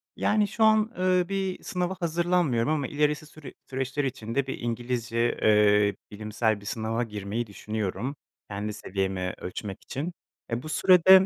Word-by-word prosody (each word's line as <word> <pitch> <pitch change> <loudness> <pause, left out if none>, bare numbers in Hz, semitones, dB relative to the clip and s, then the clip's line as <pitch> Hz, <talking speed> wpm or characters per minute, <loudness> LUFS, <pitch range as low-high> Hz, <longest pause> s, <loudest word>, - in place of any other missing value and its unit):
Yani, 210 -1 +2
şu 215 +2 0
an, 220 0 +5
ııı, 185 -1 +3
bir 195 -1 -2
sınava 180 +1 -1
hazırlanmıyorum 170 -7 +1
ama 145 -4 0
ilerisi 150 +2 +1
süre 155 -1 -11 0.2
süreçler 135 +2 -1
içinde 130 0 -2
bir 135 - -4
İngilizce, 120 0 -1
eee, 105 -1 +5 0.2
bilimsel 110 0 -1
bir - - -13
sınava 110 +2 -1
girmeyi 105 +1 -3
düşünüyorum 110 +5 -3 0.3
kendi 105 +1 -3
seviyemi 95 -3 -2
ölçmek 95 +2 -6
için. 155 +7 -4 0.4
Eee, 120 +2 -1
bu 155 - -6
sürede 185 +3 +7
125 Hz, 145 wpm, -27 LUFS, 105-170 Hz, 0.4 s, sürede